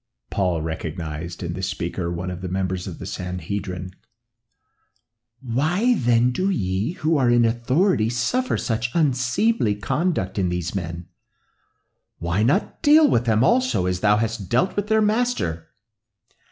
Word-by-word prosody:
Saul 90 -5 0
recognized 80 +1 -5
in 85 -1 -3
the 95 - -5
speaker 90 -1 -3
one 90 +2 -4
of 90 0 -7
the 95 - -4
members 95 0 -2
of - - -6
the - - -8
Sanhedrim. 90 +1 -5 1.5
"Why 160 - +1
then 120 - +2
do 185 +10 0
ye, 100 - -1
who 160 -3 0
are 130 -3 +3
in 120 -1 +4
authority, 120 - +2
suffer 185 - 0
such 115 +1 -1
unseemly 130 - +2
conduct 105 - -1
in 90 -2 +1
these 90 -1 -3
men? 85 -2 -5 1.1
Why 85 +4 -1
not 140 - +1
deal 305 0 +6
with 120 - +2
them 110 0 +3
also 255 - +2
as 90 0 -1
thou 105 +1 +3
hast 110 -3 -3
dealt 125 +10 +1
with 205 0 -1
their 220 0 +3
Master?" 210 - 0
110 Hz, 145 wpm, -23 LUFS, -, 1.5 s, deal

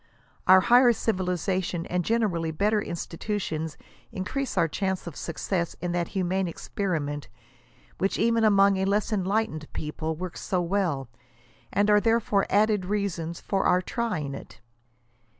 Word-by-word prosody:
Our 185 0 +8
higher 245 +4 +6
civiliza 185 -3 -1
tion 170 -1 -3
and 180 0 -1
generally 195 -7 0
better 205 +6 +1
institutions 165 -3 -4 0.3
increase 260 +9 -3
our 165 - +4
chances 190 +3 -2
of 170 -4 -7
success 170 +1 -2
in 175 0 -2
that 175 -1 0
humane 185 +1 0
experiment, 160 -6 -3 0.7
which, 195 - 0
even 230 0 +2
among 200 -2 +5
a 190 - 0
less 205 +3 +1
enlightened 190 -5 -1
people, 155 +1 -3
works 180 +2 -6
so 185 -3 0
well; 175 -7 0 0.6
and 205 +1 +2
are 210 0 +5
therefore 225 -3 +2
added 210 -1 +3
reasons 180 -5 -2
for 195 - 0
our 180 +1 +3
try 230 -5 -2
ing 140 -1 -4
it. - - -10
190 Hz, 145 wpm, -26 LUFS, 170-210 Hz, 0.7 s, Our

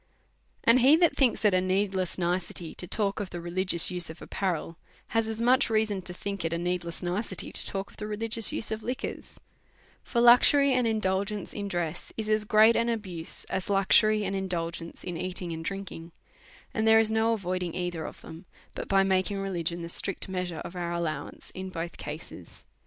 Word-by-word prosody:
And 230 +2 +6
he 265 +5 +7
that 335 -1 +3
thinks 245 -5 +2
it 205 - +5
a 185 - +3
needless 185 -1 0
nicety 175 -1 -2
to 180 - -7
talk 200 0 -1
of 200 -3 -4
the 175 - -6
religious 175 0 +3
use 180 -2 -3
of 160 - -9
apparel, 170 -3 -3 0.3
has 225 0 +1
as 225 +1 -3
much 250 +1 +4
reason 215 -3 +1
to 180 - -4
think 200 +1 -5
it 165 0 -1
a - - 0
needless 175 0 -3
nicety 185 +2 -3
to - - -1
talk 195 0 -4
of - - -18
the 210 - -5
relig'ious 225 +1 +1
use 220 - -2
of 220 0 -2
li 250 +4 -2
quors; 275 - -7 0.6
for 235 - -2
luxury 260 +4 +6
and 250 -2 +2
indulgence 200 -1 -1
in 205 -1 -4
dress 175 -3 -3
is 215 -1 -3
as 215 0 +2
great 215 +2 +6
an 230 0 +2
ahuse 190 -8 -4
as 190 - -2
luxury 210 +2 +4
and 195 +1 -2
indulgence 170 -3 -4
in 175 -2 -4
eating 180 0 -3
and 165 0 -5
drink 195 +2 -4
ing; 165 +1 -9 0.6
and 220 0 0
there 220 0 +7
is 220 -1 +2
no 220 +1 +2
avoiding 185 -4 -3
either 175 -3 -3
of - - -8
tliem, 160 +3 -11 0.3
but - - -6
by 195 -1 +4
making 190 +1 +1
religion 175 -3 -2
the - - -4
strict 190 +2 -2
measure 180 -3 -3
of 180 - -8
our 175 -1 -3
allowance 170 -2 -4
in 185 0 -6
both 170 -1 -5
cases. 150 - -9
190 Hz, 200 wpm, -28 LUFS, 175-215 Hz, 0.6 s, he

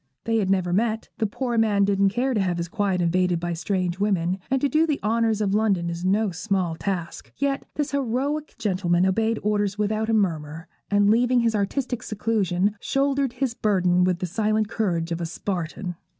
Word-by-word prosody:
They 225 0 +1
had 200 -4 0
never 185 -2 +1
met; 220 +3 0
the 220 - +1
poor 240 +2 -1
man 205 -3 +3
didn't 200 0 +3
care 250 +6 0
to 210 - +1
have 180 -2 0
his 170 0 -3
quiet 195 -2 0
invaded 180 0 +1
by 175 0 -2
strange 180 +1 -2
women, 190 -3 0
and 270 - +2
to 285 - +2
do 310 +4 +2
the 300 -3 0
honours 225 0 +1
of 200 -2 +1
London 195 -5 +1
is 170 +1 -5
no 200 +2 +2
small 180 -1 -1
task: 175 -1 -4
yet 280 +1 -1
this 295 -1 -1
heroic 280 +3 -1
gentleman 185 -5 +1
obeyed 225 +4 +1
orders 205 -1 0
without 215 +1 0
a - - +2
murmur; 165 -6 -1 0.2
and, 205 0 +4
leaving 245 +2 +3
his 230 -1 +1
artistic 240 +4 -1
seclusion, 205 -2 0
shouldered 275 -1 0
his 255 -1 -1
burden 185 -5 +2
with 180 -1 +2
the 180 - -3
silent 215 +3 0
courage 175 -7 -1
of 170 +1 -2
a - - -1
Spartan. 175 +1 -4
205 Hz, 195 wpm, -24 LUFS, 180-230 Hz, 0.2 s, and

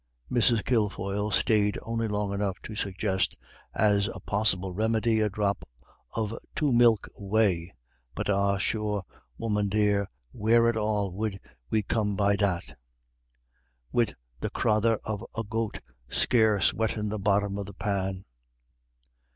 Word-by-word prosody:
Mrs. 120 -2 +3
Kilfoyle 105 -3 0
stayed 105 +1 +2
only 115 0 -1
long 105 -1 -1
enough 100 -2 -2
to 110 - -7
suggest, 95 -1 -1 0.4
as 100 -1 +3
a - - -8
possible 95 -3 +1
remedy, 110 +2 +1
a 105 -1 +2
drop 100 0 -1 0.5
of 110 -1 -1 0.2
two 145 -4 +1
milk 120 -3 +5
whey. 100 -4 +1 0.4
"But - - -2
ah, 100 0 +2
sure, 105 -1 -1 0.3
woman 105 -2 0
dear, 105 -1 +2 0.2
where 115 +1 +3
at 115 - +2
all 105 -2 -1
'ud 100 -3 -2 0.3
we 110 -1 +1
come 105 -1 0
by 100 0 +3
that, 85 -10 -1 1.2
wid 120 -3 +1 0.2
the - - -2
crathur 110 +1 +2
of 105 0 -4
a 115 - 0
goat 115 0 -3 0.3
scarce 110 -4 +3
wettin' 110 -1 -1
the 105 0 -3
bottom 100 0 +1
of 100 - -5
the 100 - -10
pan?" 95 -2 -2
105 Hz, 135 wpm, -28 LUFS, 100-110 Hz, 1.2 s, milk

